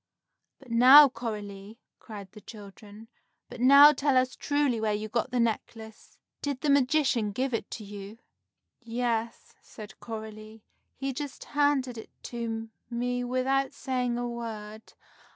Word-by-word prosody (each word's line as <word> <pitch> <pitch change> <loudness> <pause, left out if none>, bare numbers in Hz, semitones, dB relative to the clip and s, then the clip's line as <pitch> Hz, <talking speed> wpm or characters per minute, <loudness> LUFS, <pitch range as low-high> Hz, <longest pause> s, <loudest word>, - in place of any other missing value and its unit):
"But 265 -4 -15
now, 260 +5 +9
Coralie," 210 -3 -7 0.2
cried 200 -4 -10
the 210 - -13
children, 210 +1 -13 0.4
"but - - -9
now 280 +3 +9
tell 275 -1 +1
us 255 0 +1
truly 285 -6 0
where 215 -1 0
you 215 +1 -4
got 235 +4 -2
the 250 -1 -1
necklace. 220 -1 -4 0.2
Did 280 -3 -3
the 295 - +1
magician 270 -5 +2
give 255 +5 -2
it 230 - -3
to 220 - -7
you?" 205 +1 -9 0.6
"Yes," 230 -1 -3
said 210 -2 -12
Coralie, 220 -1 -9 0.3
"he 270 0 -4
just 285 0 -7
handed 280 -5 0
it - - -11
to 225 -2 -5 0.2
me 245 +1 -2
without 260 +2 0
saying 250 -3 -2
a 245 0 -2
word. 220 -2 -7
235 Hz, 140 wpm, -28 LUFS, 220-260 Hz, 0.6 s, now